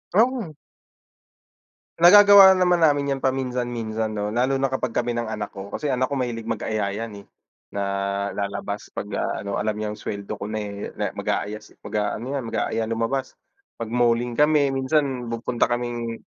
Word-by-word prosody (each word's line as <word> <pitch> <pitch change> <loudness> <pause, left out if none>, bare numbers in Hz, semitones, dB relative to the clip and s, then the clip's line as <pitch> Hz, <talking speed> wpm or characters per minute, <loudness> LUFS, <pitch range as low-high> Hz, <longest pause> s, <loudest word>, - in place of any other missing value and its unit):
Mhm. 235 -4 +2 1.5
Nagagawa 200 +1 +9
naman 180 -1 +3
namin 145 -3 +3
'yan 135 - -1
paminsan-minsan 120 -4 -2
'no, 105 0 -2
lalo 125 +4 +1
na 135 0 0
kapag 130 -3 -2
kami 120 0 0
ng 120 -1 -2
anak 105 -2 -4
ko, 100 0 -8
kasi 150 -2 -2
anak 130 0 +1
ko 140 - -3
mahilig 120 -4 -3
mag-aya 110 -2 -1
'yan, 115 +1 -5
eh, 100 - -15 0.5
na 100 - -1 0.5
lalabas 100 0 -4
pagka 105 0 -4 0.2
ano 100 -1 -2
alam 105 +1 -1
niyang 105 0 -4
suweldo 100 0 -5
ko 100 - -4
na 110 0 -3 0.4
na, - - -2
eh, - - -26
mag-aaya 105 +1 -2 0.3
mag-aano 105 +2 -2
'yan 140 -2 -2
mag-aaya 115 0 -1
lumabas, 115 +4 -2 0.4
mag-malling 120 +1 0
kami 150 -2 +4
minsan 135 -2 0
pupunta 115 +1 0
kaming 120 -1 -3
120 Hz, 155 wpm, -23 LUFS, 110-135 Hz, 1.5 s, Nagagawa